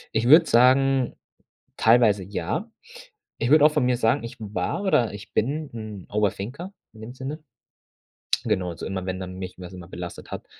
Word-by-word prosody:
Ich 115 Hz, +2 st, +1 dB
würde 160 Hz, +4 st, +8 dB
sagen, 130 Hz, +1 st, +3 dB, 0.6 s
teilweise 110 Hz, -3 st, +4 dB
ja. 100 Hz, -, -4 dB, 0.7 s
Ich 120 Hz, -, -1 dB
würde 155 Hz, -1 st, +7 dB
auch 155 Hz, -, +6 dB
von 145 Hz, -5 st, +2 dB
mir 125 Hz, -1 st, +2 dB
sagen, 120 Hz, +3 st, +1 dB
ich 115 Hz, +1 st, -7 dB
war 105 Hz, -, -3 dB
oder 120 Hz, -, +2 dB
ich 100 Hz, 0 st, -11 dB
bin 145 Hz, +6 st, -1 dB
'n 110 Hz, -4 st, -8 dB
Over-Thinker 105 Hz, -, -2 dB, 0.2 s
in 110 Hz, -, -15 dB
dem 120 Hz, +3 st, -8 dB
Sinne. 140 Hz, +4 st, -6 dB, 1.0 s
Genau, 95 Hz, -5 st, 0 dB
also 80 Hz, -, -7 dB
immer, 95 Hz, -1 st, -4 dB
wenn 95 Hz, 0 st, -3 dB
dann 90 Hz, 0 st, -7 dB
mich 95 Hz, -1 st, -6 dB
was 90 Hz, -1 st, -9 dB
immer 90 Hz, -2 st, -10 dB
belastet 90 Hz, -1 st, -8 dB
hat, -, -, -6 dB
115 Hz, 175 wpm, -24 LUFS, 95-135 Hz, 1.0 s, würde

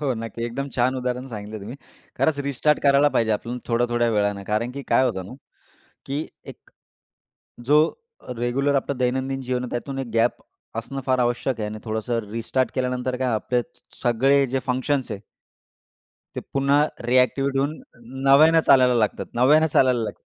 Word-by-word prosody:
हो, 140 Hz, -3 st, 0 dB
नक्की. 115 Hz, +1 st, -6 dB
एकदम 135 Hz, +4 st, -4 dB
छान 125 Hz, +1 st, +2 dB
उदाहरण 125 Hz, 0 st, -3 dB
सांगितले 105 Hz, +1 st, -6 dB
तुम्ही. 115 Hz, +7 st, -8 dB, 0.4 s
खरंच 155 Hz, -2 st, +1 dB
रिस्टार्ट 145 Hz, +2 st, +1 dB
करायला 140 Hz, +1 st, +5 dB
पाहिजे 110 Hz, -1 st, +2 dB
आपण 120 Hz, +3 st, -6 dB
थोड्या-थोड्या 120 Hz, 0 st, +1 dB
वेळाने. 100 Hz, -2 st, 0 dB
कारण 110 Hz, +3 st, 0 dB
की 140 Hz, +1 st, -6 dB
काय 130 Hz, -, +5 dB
होतं 95 Hz, -7 st, -2 dB
ना, -, -, -10 dB, 0.7 s
की 145 Hz, +3 st, -3 dB, 0.3 s
एक -, -, -28 dB, 1.0 s
जो 150 Hz, -, +7 dB, 0.6 s
रेग्युलर 135 Hz, +4 st, 0 dB
आपलं 140 Hz, 0 st, -1 dB
दैनंदिन 130 Hz, +1 st, -1 dB
जीवन 125 Hz, -1 st, -2 dB
आहे, 125 Hz, -, -5 dB
त्यातून 135 Hz, +3 st, -4 dB
एक 135 Hz, -2 st, -4 dB
गॅप 115 Hz, +1 st, +1 dB, 0.4 s
असणं 135 Hz, +4 st, -5 dB
फार 130 Hz, -1 st, +2 dB
आवश्यक 120 Hz, 0 st, 0 dB
आहे. 105 Hz, -, -2 dB
आणि 110 Hz, -, -6 dB
थोडंसं 110 Hz, +1 st, -2 dB
रिस्टार्ट 115 Hz, +3 st, -1 dB
केल्यानंतर 125 Hz, -1 st, -1 dB
काय, 130 Hz, 0 st, -1 dB
आपले 120 Hz, +3 st, 0 dB
स 165 Hz, -, -23 dB
सगळे 135 Hz, +3 st, +3 dB
जे 135 Hz, +1 st, -1 dB
फंक्शन्स 130 Hz, 0 st, -1 dB
आहे. 100 Hz, -, -6 dB, 1.2 s
ते -, -, -2 dB
पुन्हा 140 Hz, +1 st, +3 dB, 0.3 s
रिएक्टिव्हेट 135 Hz, +2 st, +2 dB
होऊन 140 Hz, +3 st, 0 dB, 0.5 s
नव्यानं 155 Hz, +4 st, +7 dB
चालायला 125 Hz, -2 st, +6 dB
लागतात -, -, -7 dB, 0.2 s
नव्यानं 155 Hz, +4 st, +5 dB
चालायला 130 Hz, -2 st, +4 dB
लागतात. 110 Hz, -, -7 dB
125 Hz, 160 wpm, -23 LUFS, 120-135 Hz, 1.2 s, जो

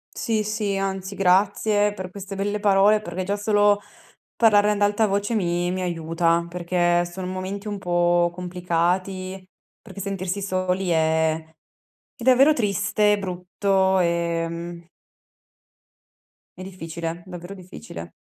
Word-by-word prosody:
Sì, 220 Hz, -2 st, 0 dB
sì, 210 Hz, -1 st, -2 dB
anzi 195 Hz, 0 st, -3 dB
grazie 200 Hz, +2 st, +2 dB
per 185 Hz, -2 st, -7 dB
queste 195 Hz, +1 st, -8 dB
belle 205 Hz, +2 st, -2 dB
parole, 205 Hz, +1 st, +4 dB
perché 180 Hz, -2 st, -5 dB
già 200 Hz, +2 st, -1 dB
solo 205 Hz, 0 st, +3 dB, 0.6 s
parlarne 210 Hz, -2 st, +5 dB
ad 205 Hz, -1 st, -2 dB
alta 205 Hz, +2 st, +3 dB
voce 205 Hz, +2 st, -1 dB
mi 175 Hz, -3 st, 0 dB
mi 185 Hz, +1 st, -2 dB
aiuta, 170 Hz, -1 st, 0 dB
perché 175 Hz, 0 st, +1 dB
sono 180 Hz, +1 st, -6 dB
momenti 190 Hz, +3 st, -5 dB
un 205 Hz, -1 st, -3 dB
po' 175 Hz, -1 st, +2 dB
complicati, 180 Hz, +2 st, -2 dB, 0.4 s
perché -, -, -11 dB
sentirsi 195 Hz, 0 st, -3 dB
soli 185 Hz, -1 st, -1 dB
è 160 Hz, -1 st, +2 dB, 0.8 s
è -, -, -9 dB
davvero 260 Hz, +4 st, +6 dB
triste, 210 Hz, -2 st, +1 dB
brutto, 190 Hz, 0 st, 0 dB
ehm 170 Hz, 0 st, -2 dB, 1.7 s
È -, -, -8 dB
difficile, 170 Hz, -2 st, -6 dB
davvero 180 Hz, +1 st, -8 dB
difficile. 175 Hz, -, -10 dB
185 Hz, 120 wpm, -23 LUFS, 175-205 Hz, 1.7 s, davvero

